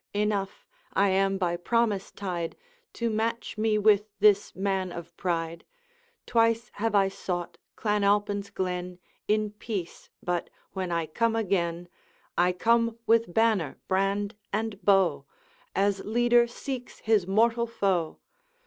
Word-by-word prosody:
Enough, 205 -2 -1 0.3
I 200 +1 +4
am 195 0 +2
by 175 -2 0
promise 210 +2 0
tied 175 -4 -4 0.4
To 235 - -2
match 225 +2 -2
me 215 0 +1
with 210 0 +4
this 205 -1 +4
man 190 -1 -1
of 170 -1 -8
pride: 170 -2 -2 0.6
Twice 230 0 +2
have 220 +1 -1
I 195 -1 +5
sought 180 -2 -4 0.2
Clan 210 -2 0
Alpine's 205 0 +1
glen 180 -2 -3 0.3
In 215 0 +1
peace; 210 -4 -6
but 175 -1 -1 0.2
when 185 -2 -3
I 170 -1 0
come 225 +9 0
again, 175 -5 -1 0.5
I 180 +1 +3
come 230 +4 +2
with 230 -3 +3
banner, 215 -8 +2
brand, 195 +2 0 0.2
and 215 -1 -2
bow, 180 -8 +3 0.5
As 195 0 +1
leader 240 +2 +3
seeks 250 +1 -6
his 215 -5 +2
mortal 230 +4 +3
foe. 190 -8 0
200 Hz, 130 wpm, -27 LUFS, 180-225 Hz, 0.6 s, I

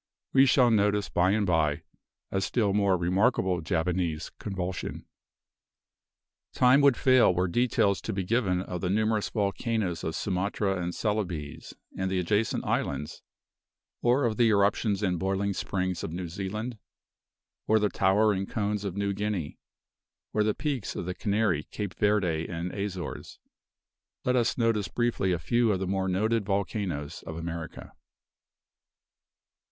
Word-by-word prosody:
We 135 0 +6
shall 125 -2 +5
notice 105 -1 +2
by 90 +2 +2
and 105 +1 +2
by 80 -5 +1 0.5
a 95 - 0
still 100 0 +1
more 100 -2 +3
remarkable 90 0 +1
Javanese 85 -1 -1
convulsion. 95 -2 -4 1.5
Time 125 +3 +5
would 140 -3 +5
fail 130 -6 +5
were 90 +1 +1
details 100 -1 +1
to - - -4
be 95 -2 -2
given 95 -3 +1
of 90 -2 -5
the 90 - -1
numerous 110 +1 +1
volcanoes 100 -3 -1
of 80 - -3
Sumatra 95 0 -1
and 85 0 -3
Celebes 90 -9 -3 0.2
and 95 0 -1
the 95 - -1
adjacent 105 +5 0
islands, 70 +1 -2 0.8
or 125 +4 +3
of 110 -2 0
the 120 - +4
eruptions 100 0 +2
and 90 -3 0
boiling 95 +2 0
springs 90 -1 -2
of - - -4
New 90 +1 -4
Zealand, 105 +6 -5 0.9
or 110 - +4
the 105 -1 +2
towering 100 0 +2
cones 105 -2 -2
of 100 -1 -4
New 100 0 0
Guinea, 100 -6 -3 0.7
or 105 - +2
of 105 - +2
the 105 - +1
peaks 140 -8 -3
of - - -4
the 90 - -3
Canary, 100 -4 0
Cape 100 -4 -5
Verde 95 -6 +1
and 85 +1 -4
Azores. 100 -3 -5 0.9
Let 125 - +2
us 120 -2 +1
notice 115 -5 +1
briefly 115 0 0
a 90 - +1
few 120 +6 +2
of 95 - +1
the 95 - -2
more 95 0 -1
noted 110 +4 +1
volcanoes 95 -6 -2
of 80 - -5
America. 85 -1 -6
100 Hz, 145 wpm, -28 LUFS, 90-110 Hz, 1.5 s, We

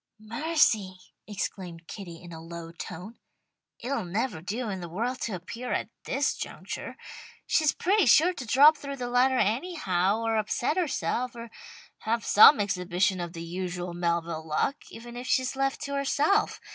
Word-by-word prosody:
"Mercy!" 220 - +1 0.3
exclaimed 180 -4 -5
Kitty 175 -3 -9
in 175 - -11
a 160 -1 -8
low 165 0 -8
tone. 180 +6 -8 0.6
"It'll 270 0 -3
never 200 0 -2
do 220 +7 -3
in 190 -3 -4
the 175 - -7
world 235 +9 -3
to 215 - -2
appear 210 +8 -6
at - - -2 0.2
this 275 +1 0
juncture. - - -6 0.5
She's 310 -3 +3
pretty 390 -2 +2
sure 320 +9 +6
to 265 -8 -7
drop 290 +6 +7
through 280 -1 -6
the 245 -2 -4
ladder 255 +1 +3
anyhow, 215 - 0
or 225 -1 +1
upset 220 +7 0
herself, 255 -7 -1
or 230 -1 -9 0.5
have 230 0 -1
some 215 +6 +8
exhibition 185 -1 0
of 175 -1 -5
the 165 -1 -6
usual 180 0 -4
Melville 170 -2 -2
luck, 155 - 0
even 240 +1 -10
if 245 +1 -6
she's 260 -1 +1
left 270 0 -1
to 280 - -4
herself. 285 +9 +1
220 Hz, 160 wpm, -27 LUFS, 180-265 Hz, 0.6 s, some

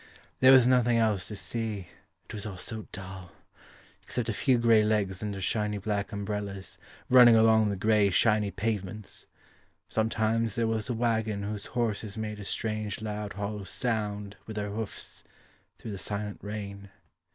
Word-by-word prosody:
There 130 0 +8
was 130 -2 +8
nothing 120 -2 +4
else 110 -5 +1
to 105 - -6
see 110 -4 -3 0.4
It - - -11
was 110 0 -5
all 95 -3 -6
so 110 +4 -4
dull 95 -1 -8 0.7
Except 120 -2 -3
a - - 0
few 125 +4 +3
grey 115 -2 +5
legs 105 -3 0
under 105 -2 -3
shiny 105 +2 0
black 100 0 -2
umbrellas 100 -1 -4 0.3
Running 125 -2 +8
along 110 -1 +5
the 100 - -1
grey 105 +1 +3
shiny 105 +1 +3
pavements; 105 0 -3 0.6
Sometimes 110 0 0
there 115 - +1
was 110 0 -1
a 120 - 0
waggon 110 -3 0
Whose 105 0 -4
horses 110 -3 -1
made 105 -1 -4
a 100 - -7
strange 110 0 -2
loud 105 -1 -4
hollow 105 0 -4
sound 105 -2 -2
With 110 - -6
their 105 -1 -3
hoofs 110 0 -6 0.5
Through 110 - -7
the 100 - -5
silent 105 0 -4
rain. 100 -1 -6
105 Hz, 160 wpm, -29 LUFS, 100-110 Hz, 0.7 s, There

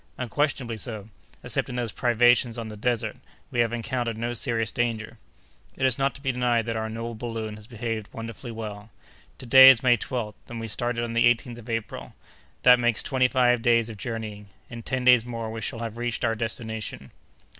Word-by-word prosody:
"Unquestionably 125 -2 -1
so; 110 -2 -7 0.3
excepting 125 - -1
those 120 -3 -2
privations 120 0 +3
on 115 -1 -5
the 105 - -8
desert, 115 +1 -1 0.3
we 120 - -2
have 115 -1 +3
encountered 120 -1 -2
no 120 +1 -2
serious 115 -2 -1
danger." 115 -1 -2 0.6
"It 130 - 0
is 130 -1 +2
not 135 0 +1
to 140 - -11
be 135 -2 0
denied 120 -2 +1
that 115 -1 -2
our 110 0 -2
noble 115 +1 -5
balloon 115 -1 -5
has 105 0 -13
behaved 115 -3 -4
wonderfully 115 +3 -7
well. 110 -1 -7 0.5
To 130 - -10
day 130 +2 +10
is 130 -2 +5
May 125 -2 +5
12th, 115 -2 -4 0.2
and 120 -1 -6
we 115 - -5
started 120 +2 -2
on 115 -1 -4
the 115 - +3
18th 120 0 -4
of 120 +1 -12
April. 115 -1 -4 0.5
That 125 0 +7
makes 120 -2 +2
twenty 130 -2 +2
five 125 -2 +3
days 115 -1 +3
of 110 - -10
journeying. 110 -2 -6 0.2
In 115 -1 -7
ten 130 +2 -3
days 125 -2 +7
more 115 -2 -5
we 110 0 -6
shall 115 +2 -5
have 115 -1 -5
reached 120 0 -2
our 115 - +2
destination." 110 - -5
115 Hz, 200 wpm, -26 LUFS, 110-125 Hz, 0.6 s, day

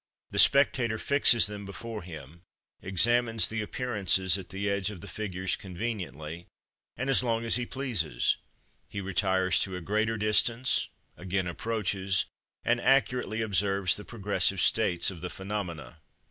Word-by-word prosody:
The - - -1
spectator 125 -5 +5
fixes 135 -3 +5
them 105 -1 -6
before 105 +3 -7
him, 80 -2 -11 0.4
examines 115 +4 +2
the 110 0 -3
appearances 100 -6 +1
at 95 -2 -6
the 100 +2 -3
edge 100 -1 0
of 105 -4 -8
the - - -10
figures 95 -3 -3
conveniently, 90 -5 -6 0.5
and 130 +4 -3
as 135 - +5
long 115 -2 -1
as 115 - +4
he 125 0 -2
pleases; 105 - -1 0.5
he 100 - -5
retires 95 -1 +1
to 95 -2 -1
a - - -4
greater 110 +5 0
distance, 115 +4 +2 0.3
again 95 +1 -2
approaches, 95 0 -1 0.4
and 120 0 +1
accurately 125 -4 +1
observes 100 -3 +1
the 105 - -8
progressive 100 -4 -1
states 90 -3 +1
of 85 -4 -11
the 90 - -4
phenomena. 95 -10 -6
100 Hz, 145 wpm, -28 LUFS, 95-115 Hz, 0.5 s, spectator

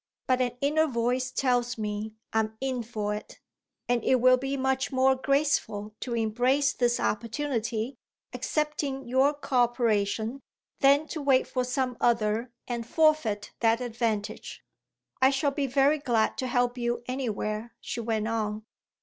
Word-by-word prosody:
But 255 0 +2
an 245 -1 -1
inner 310 +3 +3
voice 250 0 0
tells 245 -3 0
me 215 0 -4 0.2
I'm 220 0 0
in 260 -2 -2
for 215 -2 -3
it. 210 - -8 0.5
And 240 -2 +1
it 260 - +4
will 255 +1 +5
be 270 +2 -3
much 265 +1 0
more 265 0 +4
graceful 260 -7 0
to 240 -2 -3
embrace 245 +6 +2
this 240 -1 +1
opportunity, 235 0 -2 0.3
accepting 290 -3 -2
your 260 +3 +4
co 280 -2 -2
operation, 230 0 +1 0.4
than 280 +2 +4
to 315 - -4
wait 270 -2 +3
for 255 - -1
some 250 -1 -1
other 230 0 +1 0.2
and 235 -2 -4
forfeit 300 -10 +2
that 225 0 +3
advantage." 230 -4 -3 0.6
"I 260 - +7
shall 280 +1 +1
be 275 0 -1
very 275 +3 +3
glad 235 -6 +1
to 260 - -1
help 245 0 0
you 240 0 -1
anywhere," 230 -3 -3
she - - -5
went 220 -1 -1
on. 215 -1 -2
245 Hz, 150 wpm, -28 LUFS, 225-270 Hz, 0.6 s, I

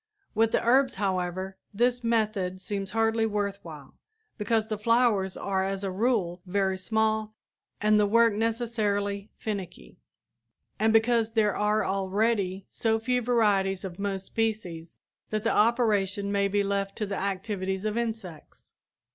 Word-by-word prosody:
With 225 +1 +2
the - - +1
herbs, 260 +2 +4
however, 190 -1 -2
this 245 +3 +1
method 215 -5 0
seems 195 0 -4
hardly 225 +1 +1
worth 205 -2 -2
while, 150 -5 -11 0.4
because 220 0 0
the 215 -2 -3
flowers 220 -4 +2
are 190 -1 -1
as 195 +1 -3
a 195 - -2
rule 190 -4 0
very 190 0 +1
small 220 +1 0 0.4
and 210 0 +4
the 205 - +3
work 230 +1 +4
necessarily 210 -3 -1
finicky, 200 -5 -6 0.8
and 220 +1 +3
because 225 0 +3
there 215 -3 +2
are 210 +1 +1
already 195 0 0
so 225 -1 0
few 250 +2 0
varieties 205 -5 +1
of 180 0 -7
most 195 -1 -2
species 190 -8 -3 0.3
that 215 -1 -2
the 230 - +2
operation 205 -3 +2
may 200 0 +2
be 200 +1 +1
left 195 0 -2
to 215 - -2
the 195 -1 -4
activities 190 0 -3
of 215 0 -1
insects. 220 -8 -6
210 Hz, 145 wpm, -27 LUFS, 195-225 Hz, 0.8 s, herbs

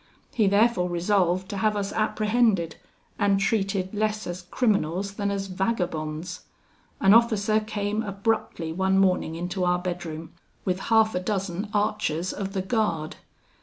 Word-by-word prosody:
He 215 -4 +3
therefore 200 -2 +3
resolved 180 +1 +1
to 200 - -4
have 210 +1 +1
us 200 -1 -2
apprehended, 215 -4 +1 0.4
and 200 -1 +3
treated 195 -2 0
less 215 0 -1
as 175 +1 -5
criminals 195 -2 0
than 200 0 -2
as 200 -1 -2
vagabonds. 180 -4 -2 0.6
An 195 +1 +6
officer 220 -2 +4
came 215 0 -2
abruptly 200 -5 -2
one 190 +2 +1
morning 185 -4 +2
into 180 +2 -3
our 180 0 +3
bedroom, 175 -3 -5 0.3
with 185 -1 0
half 220 -1 +4
a 180 - 0
dozen 195 0 -3
archers 205 -5 0
of 195 -1 -4
the 190 -2 -1
guard. 185 -8 -1
195 Hz, 140 wpm, -26 LUFS, 180-215 Hz, 0.6 s, An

